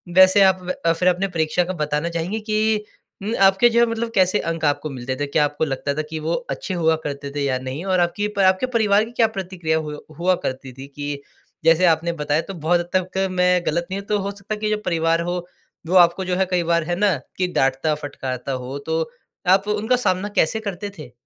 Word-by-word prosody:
वैसे 190 +2 +7
आप 185 -2 +4 0.2
अ, 165 - +4
फिर 180 +2 0
अपने 185 +2 0
परीक्षा 165 0 0
का 185 +2 -4
बताना 150 +3 -1
चाहेंगे 170 +6 -2
कि 215 0 0 0.4
म 220 +3 -2
आपके 195 +5 +6
जो 235 0 +2
है 235 - +6
मतलब 230 0 -2
कैसे 185 +2 +3
अंक 165 -1 -3
आपको 145 +1 0
मिलते 130 -1 -4
थे? 145 - -2
क्या 150 +1 +2
आपको 145 +2 -1
लगता 140 0 -2
था 155 - -1
कि 160 - -4
वो 160 +2 -2 0.2
अच्छे 190 - -4
हुआ 160 -2 +2
करते 140 -1 -5
थे 145 - -1
या 130 -2 +1
नहीं? 130 +6 -5
और 185 -2 +2
आपकी 190 +4 0
प - - 0
आपके 185 +5 +4
परिवार 210 -2 +3
की 230 - -11
क्या 235 -2 +3
प्रतिक्रिया 185 -6 -2
हु 150 -1 -5 0.2
हुआ 180 +1 +3
करती 130 0 -4
थी 135 +2 -10
कि 145 -1 -4 0.4
जैसे 165 +2 +5
आपने 165 0 +2
बताया 150 +2 +1
तो 195 - -8
बहुत 175 +1 +1
हद 175 0 -5
तक 185 +1 0
मैं 180 -1 +3
गलत 170 +2 -1
नहीं 195 - -2
हूँ 200 - -11
तो 210 -1 +1
हो 200 +1 -3
सकता 200 +1 -6
है 210 - -5
कि 215 - -1
जो 215 - +1
परिवार 165 -1 +1
हो, 175 0 -3 0.4
वो 185 - 0
आपको 175 +1 +5
जो 180 0 0
है 190 +1 +2
कई 180 -1 +2
बार 170 -1 +1
है 175 +2 -2
ना 205 -2 +3 0.2
कि 185 - +1
डाँटता 135 +3 +2
फटकारता 135 -3 -5
हो 130 +2 -4
तो 160 0 0 0.5
आप 190 +2 +4
वो 210 - +1
उनका 220 +4 +1
सामना 200 -5 0
कैसे 220 +8 +2
करते 205 -1 -5
थे? 125 - -9
175 Hz, 235 wpm, -22 LUFS, 155-195 Hz, 0.5 s, वैसे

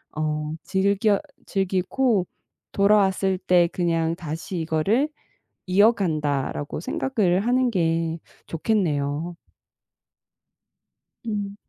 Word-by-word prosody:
어 150 0 -2
즐겨 200 +2 +2 0.3
즐기고 195 +2 0 0.4
돌아왔을 195 -2 +3
때 180 -2 +4
그냥 165 -2 0
다시 170 +2 -5
이거를 195 - +1 0.6
이어간다.'라고 160 - +1
생각을 195 -6 0
하는 250 0 +3
게 165 -3 0 0.3
좋겠네요. 165 -3 -1 1.9
음. 205 -2 -3
185 Hz, 180 characters per minute, -24 LUFS, 160-200 Hz, 1.9 s, 때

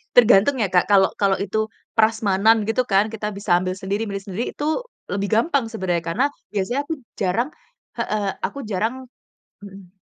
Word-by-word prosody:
Tergantung 245 +2 +6
ya 210 - +2
Kak, 180 -1 +3
kalau 195 -1 +5
kalau 195 -1 +3
itu 215 +2 -1 0.3
prasmanan 220 -1 +3
gitu 225 +3 +1
kan 200 +2 +2
kita 210 -1 -4
bisa 200 -3 +1
ambil 185 0 -2
sendiri, 195 +3 -2
milih 195 -1 -5
sendiri, 200 +5 -3
itu 295 - -3 0.5
lebih 200 0 -1
gampang 260 +3 +2
sebenarnya 180 -6 -1
karena 175 +11 +1 0.3
biasanya 210 +7 -1
aku 325 - -1 0.3
jarang 210 +7 0 0.5
heeh 210 -1 -1 0.2
aku 280 - -3
jarang 215 +3 -1 0.7
mhm. 195 -1 -13
205 Hz, 160 wpm, -22 LUFS, 190-225 Hz, 0.7 s, Tergantung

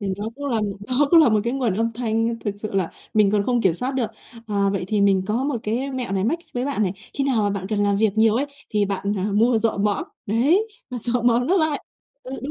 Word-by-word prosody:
Thì 200 - -4
nó 205 - -5
cũng 285 - -7
là 225 -3 +1 0.3
nó 270 +3 +2
cũng 335 -2 +8
là 300 - +6
một 215 -1 +3
cái 235 - 0
nguồn 250 -8 0
âm 230 +2 0
thanh 230 0 -1
thực 205 -2 -3
sự 215 0 -6
là 185 -4 0 0.2
mình 210 -2 +4
còn 205 -1 +2
không 245 +1 +1
kiểm 185 -5 +2
soát 250 +9 -2
được. 235 -4 -1 0.4
À, 200 -2 +1
vậy 195 -2 -2
thì 210 -1 +1
mình 195 -2 +4
có 230 +5 0
một 285 -3 0
cái 245 +6 -2
mẹo 255 -5 -4
này 195 0 0
mách 320 +9 +1
s - - -24
với 245 0 -1
bạn 275 -6 -1
này, 185 -2 0 0.2
khi 275 - 0
nào 245 -6 +2
mà 205 - +1
bạn 195 -2 -3
cần 215 - -1
làm 205 -1 +2
việc 215 0 +2
nhiều 220 0 +4
ấy, 270 +5 +1 0.2
thì 210 -1 +2
bạn, 200 0 -2
à, 185 - -1
mua 225 +3 +3
rọ 220 -2 0
mõm, 205 0 0 0.2
đấy, 290 - +2 0.2
và 250 - -4
rọ 240 0 0
mõm 240 +1 +3
nó 375 +5 +3
lại. 315 -4 0 0.4
Ừ, 255 - -9
đó, 280 - -4
225 Hz, 280 wpm, -22 LUFS, 205-250 Hz, 0.4 s, cũng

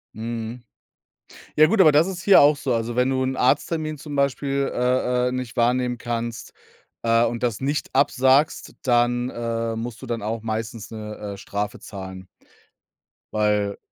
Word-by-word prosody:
Mhm. 115 +1 -5 0.9
Ja 155 +1 +7
gut, 215 -2 +4
aber 155 -4 +7
das 155 +5 +4
ist 180 -3 -5
hier 200 -6 +7
auch 145 +1 +6
so. 130 -3 -1
Also, 115 +1 -2
wenn 125 +1 +2
du 130 0 0
'n 130 0 -1
Arzttermin 155 +4 0
zum 145 0 -7
Beispiel, 140 0 0
äh 125 0 +1
äh, - - -4
nicht 130 -1 -5
wahrnehmen 125 +1 +1
kannst, 115 -1 -4 0.5
äh, 115 0 +4
und 115 0 -3
das 120 -2 -1
nicht 145 +3 -1
absagst, 135 +2 +2
dann, 120 0 +2
äh, 115 -1 -3
musst 115 +1 -6
du - - -7
dann 115 -2 -3
auch 110 +1 -3
meistens 110 0 -4
'ne, 105 -1 -7 0.2
äh, 100 - -9
Strafe 100 +1 -4
zahlen 95 -2 -9 1.1
weil, 105 -1 +1
120 Hz, 165 wpm, -23 LUFS, 115-135 Hz, 1.1 s, Ja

